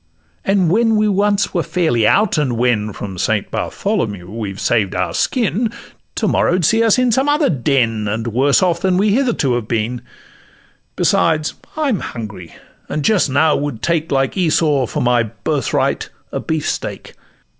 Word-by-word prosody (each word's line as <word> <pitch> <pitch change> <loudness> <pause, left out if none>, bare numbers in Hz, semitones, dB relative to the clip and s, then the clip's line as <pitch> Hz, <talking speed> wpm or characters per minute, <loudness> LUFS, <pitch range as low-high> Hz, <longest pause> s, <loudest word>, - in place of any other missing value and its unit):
And 190 -4 +2
when 225 +2 +3
we 215 0 +2
once 200 0 +1
were 175 - +1
fairly 160 -12 +1
out, 205 - +3
and 130 -6 -1
when 115 -3 +1
From 95 -2 -7
Saint - - -1
Bartholomew 105 - -3
we 110 -2 -4
have 95 0 -8
saved 105 -4 0
our 90 0 -1
skin, 230 -2 0 0.4
To - - 0
morrow 180 - +2
'd 175 - 0
see 225 +9 +3
us 225 0 +4
in 250 -1 +2
some 265 +5 +2
other 295 0 +2
den, 120 -6 0
And 110 +3 -2
worse 135 - +2
off 170 -2 +1
than 185 -1 +1
we 205 +2 +2
hitherto 235 - +1
have 120 -3 -2
been; 115 +2 -2 0.9
Besides, 155 -2 +1 0.2
I'm 280 -9 0
hungry, 105 -7 -8 0.3
and 150 -1 -2
just 205 -9 +3
now 145 +4 +3
would 140 -6 -4
take, 165 -2 0
Like 135 -1 +1
Esau, 155 -7 +2
for - - -2
my 120 -1 +3
birthright 110 -2 -1 0.2
a - - -3
beef 160 -2 -2
steak. - - -4
150 Hz, 170 wpm, -18 LUFS, -, 0.9 s, us